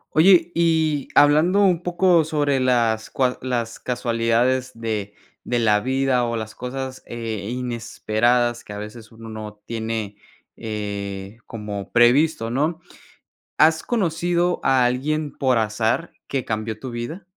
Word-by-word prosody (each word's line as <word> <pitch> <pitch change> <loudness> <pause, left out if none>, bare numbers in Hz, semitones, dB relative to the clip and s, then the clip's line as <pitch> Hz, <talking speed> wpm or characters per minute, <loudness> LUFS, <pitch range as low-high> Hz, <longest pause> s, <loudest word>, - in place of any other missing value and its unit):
Oye, 175 +1 +5
y 160 -4 +1
hablando 155 +7 +5
un 180 -4 +3
poco 175 -1 +3
sobre 145 -3 0
las 115 -4 +1
cua 125 -1 0
las 120 -3 -2
casualidades 120 +1 0
de 110 -3 -4 0.3
de 120 - 0
la 105 -3 +3
vida 130 +1 +1
o 115 0 -2
las 110 -1 -5
cosas, 130 +1 -6
eh, 110 -3 -5
inesperadas 120 0 0
que - - -10
a - - -6
veces 105 +2 -9
uno 115 0 -11
no 105 -1 -8
tiene, 110 -3 -4 0.4
eh, 100 -1 -5
como 105 -3 -6
previsto, 120 +1 +4
¿no? 155 +7 0 0.8
¿Has 160 +1 +4
conocido 175 -4 0
a 130 -2 +4
alguien 145 +5 -1
por 130 -3 +2
azar 110 +8 0
que 135 -3 -2
cambió 110 0 -3
tu 130 - -6
vida? 120 +11 -6
120 Hz, 135 wpm, -22 LUFS, 110-150 Hz, 0.8 s, Oye